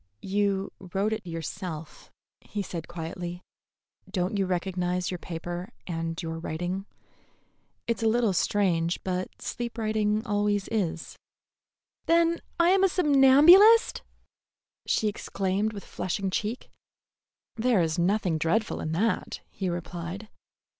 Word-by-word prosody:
"You 195 0 0
wrote 195 +3 -1
it 215 -4 -5
yourself," 165 0 -6 0.3
he 205 -1 -5
said 170 -3 -6
quietly. 175 +1 -6 0.7
"Don't 185 +1 -1
you 195 -2 +1
recognize 180 0 -1
your 180 - -4
paper 175 +2 -5 0.2
and 165 -1 -3
your 165 0 -4
writing? 175 +4 -4 1.0
It's 235 0 -1
a 225 - +2
little 225 -2 +2
strange, 175 -3 +1
but 185 0 -3
sleep 240 -1 -4
writing 215 0 0
always 205 -2 0
is." 180 -7 -2 0.9
"Then 335 0 +3 0.2
I 340 +1 +5
am 390 0 +4
a 385 - +5
somnambulist!" 340 +8 +6 0.9
she 215 - +2
exclaimed, 200 0 -1
with 200 -2 -8
flushing 190 +1 -3
cheek. 215 +6 -3 0.8
"There 235 -2 +2
is 160 +1 -1
nothing 180 -2 +1
dreadful 170 +8 0
in 155 - -3
that," 215 +7 -1
he 190 -2 -3
replied. 175 +4 -5
195 Hz, 120 wpm, -27 LUFS, 175-220 Hz, 1.0 s, somnambulist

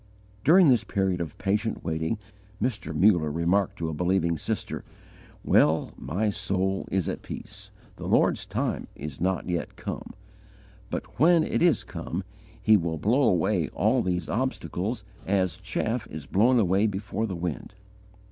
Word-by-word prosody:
During 175 0 +7
this 120 -4 +4
period 95 -4 0
of 80 -3 -5
patient 105 +3 -1
waiting, 80 +6 -1 0.4
Mr. 120 -3 -2
Muller 90 -6 +3
remarked 85 +5 +1
to 85 - -2
a - - -3
believing 85 +1 +1
sister: - - -3 0.6
"Well, 80 +2 +3
my 95 - -1
soul 95 0 -1
is 95 -3 0
at - - -3
peace. - - -8 0.3
The - - -6
Lord's - - +2
time - - -2
is 75 0 -7
not 95 0 0
yet 85 -2 -2
come; - - -6 0.7
but, 105 - -6
when 165 +2 +6
it - - -1
is 170 -3 +4
come, - - -5 0.4
He 110 - +5
will 85 -3 -2
blow 115 - +2
away 90 - +2
all - - +2
these 90 -1 -1
obstacles, 110 -3 -2 0.2
as 95 -4 +1
chaff 115 +1 -2
is 75 -2 -7
blown 120 - +3
away 100 +1 +3
before 105 +2 -2
the 95 - -4
wind." 85 +3 -4
95 Hz, 150 wpm, -27 LUFS, 85-110 Hz, 0.7 s, During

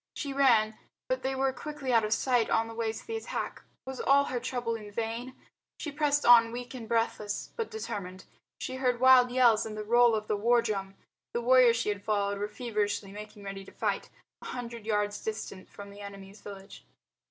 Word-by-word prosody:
She 280 -2 -4
ran, 230 -6 +3 0.3
but - - -1
they 265 0 -1
were 265 0 +1
quickly 275 -1 -4
out 230 -1 +5
of 215 - -2
sight 245 0 +2
on 225 0 +2
the 225 - -8
way 225 -1 -1
to 220 - -9
the 455 - -4
attack. 445 - -5 0.2
Was 265 -1 -6
all 280 +1 +5
her 250 -3 -2
trouble 245 -1 -2
in 215 -2 -6
vain? 230 +4 -4 0.4
She 300 - -5
pressed 290 0 +1
on 230 -1 +7
weak 245 +2 -6
and 235 -4 -8
breathless, 225 -2 -1
but 460 -2 -3
determined. 190 - -6 0.3
She 260 0 -4
heard 250 -2 +1
wild 255 -1 +7
yells 240 -3 +4
and 215 -1 -6
the 215 - -3
roll 240 +1 +5
of 215 0 -3
the - - +1
war 235 +3 +3
drum. 195 -3 -3 0.4
The 235 - -1
warriors 245 -1 +6
she 230 - -1
had 200 -1 -3
followed 200 -1 0
were 205 - -1
feverishly 210 -3 -2
making 210 0 -10
ready 195 0 -6
to - - -14
fight, - - -2 0.3
a - - -11
hundred 235 -3 -6
yards 210 -1 0
distant 210 -3 -5
from 200 0 -10
the 200 +1 -12
enemy's 200 0 -10
village. 195 -1 -10
230 Hz, 205 wpm, -29 LUFS, 210-255 Hz, 0.4 s, on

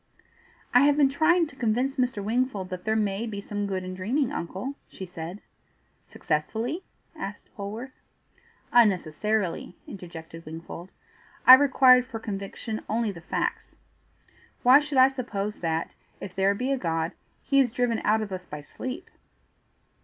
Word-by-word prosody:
"I 245 - +8
have 285 +2 +4
been 285 -2 +5
trying 330 +5 +3
to 290 - -13
convince 250 +3 0
Mr. 250 -5 0
Wingfold 220 -3 -1
that 185 -1 -6
there 220 0 +1
MAY 210 +1 0
be 205 -2 -5
some 205 0 -3
good 190 -2 -2
in 185 0 -5
dreaming, 240 +9 0
uncle," 195 +4 -4
she 190 - -8
said. 175 +2 -7 0.7
"Successfully?" 220 - -2 0.3
asked 205 -9 -8
Polwarth. 215 +6 -6 0.8
"Unnecessarily," 200 -3 +2
interjected 165 -3 -9
Wingfold. 165 +3 -8 0.6
"I 255 - +12
required 260 -2 +7
for 230 -3 -6
conviction 215 +1 -5
only 225 -1 0
the 170 -4 -11
facts. - - -3 0.9
Why 255 +3 +8
should 295 -2 -3
I 260 0 +8
suppose 225 -6 -4
that, 165 -1 -2 0.3
if 190 - -7
there 195 +1 +2
be 255 +6 -1
a 270 - 0
God, 165 -3 -1 0.3
he 275 -1 +3
is 255 -4 +3
driven 245 -2 0
out 215 +1 +2
of 205 - -7
us 185 -1 -6
by 150 0 -7
sleep?" 255 - -7
215 Hz, 150 wpm, -26 LUFS, 185-255 Hz, 0.9 s, I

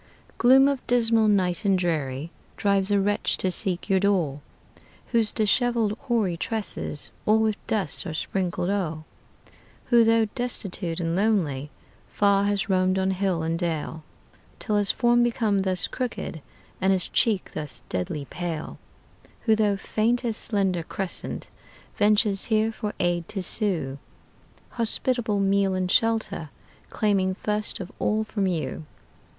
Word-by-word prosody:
Gloom 265 +3 +6
of 280 -2 -1
dismal 230 -2 +3
night 185 -2 +1
and 195 -2 +3
dreary 155 -4 -2 0.3
Drives 200 -1 +1
a 205 -1 +3
wretch 205 +1 +1
to 185 - 0
seek 180 0 +2
your 190 -1 +3
door, 180 -8 +1 0.7
Whose 230 -3 +2
disheveled 225 0 +1
hoary 220 -9 0
tresses 205 -7 -3 0.2
All 215 +1 +5
with 220 -1 -1
dust 205 -3 -1
are 160 - -4
sprinkled 180 +1 -2
o'er; 165 -6 -2 0.9
Who, 235 -1 +7
though 225 0 +4
destitute 195 -8 0
and 165 -1 -1
lonely, 175 -9 0 0.4
Far 200 -1 +2
has 200 -1 0
roamed 185 -1 +2
on 190 0 +1
hill 185 -3 -1
and 165 +1 -1
dale, 160 -2 -3 0.6
Till 210 -2 -1
his 205 -1 +1
form 240 0 +3
became 225 -4 +1
thus 185 -2 +2
crooked, 240 - -4 0.4
And 190 +1 +3
his 185 -2 +1
cheek 215 -5 +1
thus 150 -3 -5
deadly 140 +11 -3
pale; 170 0 -5 0.6
Who, 220 -2 +3
though 210 -2 +1
faint 230 +5 0
as 230 -2 -1
slender 195 -6 0
crescent, 185 +3 -5 0.5
Ventures 205 -1 +3
here 220 0 +1
for 210 -1 -5
aid 175 -1 0
to 195 -3 -4
sue, 170 - -1 0.7
Hospitable 230 -2 -1
meal 195 -1 +2
and 185 -1 -1
shelter 225 -8 +1 0.4
Claiming 195 -3 +1
first 210 +1 -1
of 190 -1 -7
all 215 +1 +1
from 205 -2 -2
you. 160 -3 -3
200 Hz, 140 wpm, -25 LUFS, 175-220 Hz, 0.9 s, Who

